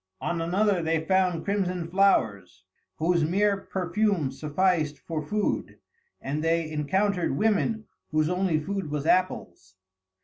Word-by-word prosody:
On 170 -1 -2
another 190 +2 +1
they 160 -1 0
found 185 -3 +1
crimson 185 -4 -1
flowers, 100 - +1 0.3
whose 170 +1 +2
mere 200 +5 +2
perfume 190 -4 -1
sufficed 155 +1 0
for 160 -2 -5
food, 205 +8 -2 0.4
and 150 +3 -3
they 165 -1 0
encountered 175 +1 0
women 220 +2 +1 0.2
whose 155 0 +1
only 180 -2 +1
food 190 +1 -4
was 145 -1 -3
apples. 95 - 0
170 Hz, 125 wpm, -26 LUFS, 155-195 Hz, 0.4 s, whose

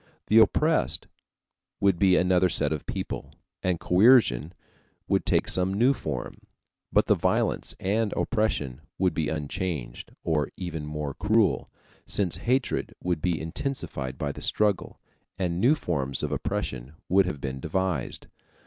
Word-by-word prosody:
The 110 - +7
oppressed 155 +8 +2 0.7
would 95 -3 +2
be 95 -2 +5
another 90 0 +3
set 75 -2 +2
of 75 - -6
people, - - -5 0.3
and 90 -3 0
coercion 90 - +4 0.6
would - - +1
take - - +2
some 95 +1 +1
new 125 +6 +4
form; 75 - -5 0.5
but - - +4
the - - +4
violence - - 0
and 105 +2 0
oppression 75 - -1 0.2
would 90 -2 +2
be 80 -2 -1
unchanged 75 -4 -4
or 75 -3 0
even 80 -5 -5
more 75 -2 -4
cruel, 105 +3 +1 0.4
since 95 -4 0
hatred 125 +1 -1
would 90 -3 -1
be 90 -1 0
intensified 80 - -4
by 70 0 -2
the - - -10
struggle, 105 -3 0 0.4
and 90 -1 -1
new 135 +6 +5
forms 70 - -2
of - - -2
oppression 65 +3 -3
would 95 0 +4
have 75 -6 -4
been 65 -1 -4
devised. 85 -1 -2
90 Hz, 140 wpm, -27 LUFS, 75-100 Hz, 0.7 s, The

